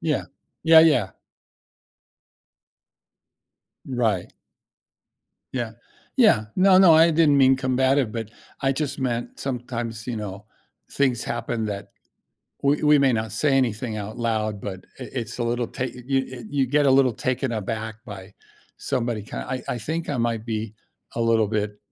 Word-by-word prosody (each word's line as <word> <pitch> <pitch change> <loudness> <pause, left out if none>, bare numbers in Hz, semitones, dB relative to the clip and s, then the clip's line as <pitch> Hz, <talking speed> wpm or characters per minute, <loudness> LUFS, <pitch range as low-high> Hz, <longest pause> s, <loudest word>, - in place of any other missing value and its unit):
Yeah. - - -1 0.4
Yeah, 160 0 +8
yeah. 150 -12 +4 2.8
Right. 115 -8 -1 1.2
Yeah. 120 -3 -3 0.4
Yeah. 215 - +4
No, 185 0 +6
no, 175 -4 +7
I 165 +1 +6
didn't 155 -3 +4
mean 135 -1 +5
combative, 130 -1 +1
but 115 -2 -5 0.3
I 135 -1 +2
just 140 0 -3
meant 120 -3 -3
sometimes, 120 -3 -4
you 120 -2 -3
know, 105 -1 -6 0.5
things 130 -4 +1
happen 115 -1 -3
that 100 -1 -5 0.7
we 140 +1 +2
we 150 -1 +5
may 135 -2 +4
not 110 -2 -2
say 150 -2 +1
anything 115 -3 -1
out 105 +1 -6
loud, 110 -3 -1
but, 95 -2 -6 0.2
i 125 - -5
it's 120 -4 -5
a 120 - -1
little 120 0 -1
ta 125 - -4
you 125 +2 -2
e 130 -2 -8
you 140 -2 +1
get 145 +2 +2
a - - +5
little 130 -2 +4
taken 130 +2 -2
aback 110 0 -4
by 100 -3 -10 0.5
somebody, 120 -5 -2
kin - - -6
I 130 0 -4
I 120 - -2
think 160 +8 -4
I 145 - -1
might 115 -2 -1
be 110 -2 -4 0.4
a - - -3
little 115 -1 +3
bit 105 -1 -2
120 Hz, 155 wpm, -24 LUFS, 110-135 Hz, 2.8 s, Yeah